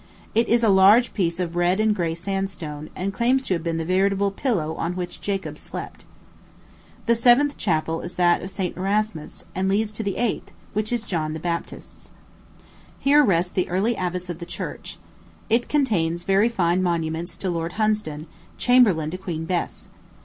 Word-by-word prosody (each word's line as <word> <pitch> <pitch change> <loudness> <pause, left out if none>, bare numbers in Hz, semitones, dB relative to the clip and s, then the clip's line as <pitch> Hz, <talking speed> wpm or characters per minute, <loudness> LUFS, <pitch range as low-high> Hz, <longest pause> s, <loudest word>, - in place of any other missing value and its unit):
It 230 +1 +2
is 235 +1 +3
a 225 - +5
large 200 +5 +6
piece 170 -4 -1
of 175 -2 -2
red 175 +3 +2
and 215 -1 +3
gray 165 -3 -1
sandstone, 175 -5 -4
and 195 +2 -3
claims 255 +6 +2
to - - 0
have 170 - -1
been 165 -1 -1
the 165 - -2
veritable 195 +2 +2
pillow 195 - -1
on 175 +2 -3
which 180 -1 -5
Jacob 195 -1 -3
slept. - - -8 1.0
The 235 - +4
seventh 245 +5 +4
chapel 165 -2 -1
is 175 - -7
that 175 -1 +3
of 185 - -6
St. 190 -2 -3
Erasmus, 195 -3 -2
and 190 +1 0
leads 210 +2 +1
to 215 - -5
the 200 -3 -2
eighth, 240 -3 -2 0.2
which 215 +2 -1
is 240 -2 0
John 155 -6 -2
the 160 - -5
Baptist's. 170 +1 -5 0.9
Here 290 +2 +5
rest 180 -6 +1
the 185 - 0
early 200 +7 +1
abbots 180 -1 -3
of 170 - -8
the 170 - -7
church. - - -6 0.5
It 235 +2 +2
contains 175 - +1
a - - -21
very 195 +4 +3
fine 180 -5 +1
monument 170 -1 -1
to 185 - -1
Lord 170 0 -3
Hunsdon, 210 -9 -1 0.3
chamberlain 205 -12 +4
to 185 - -5
Queen 165 -4 -4
Bess. 175 0 -3
185 Hz, 180 wpm, -23 LUFS, 170-215 Hz, 1.0 s, large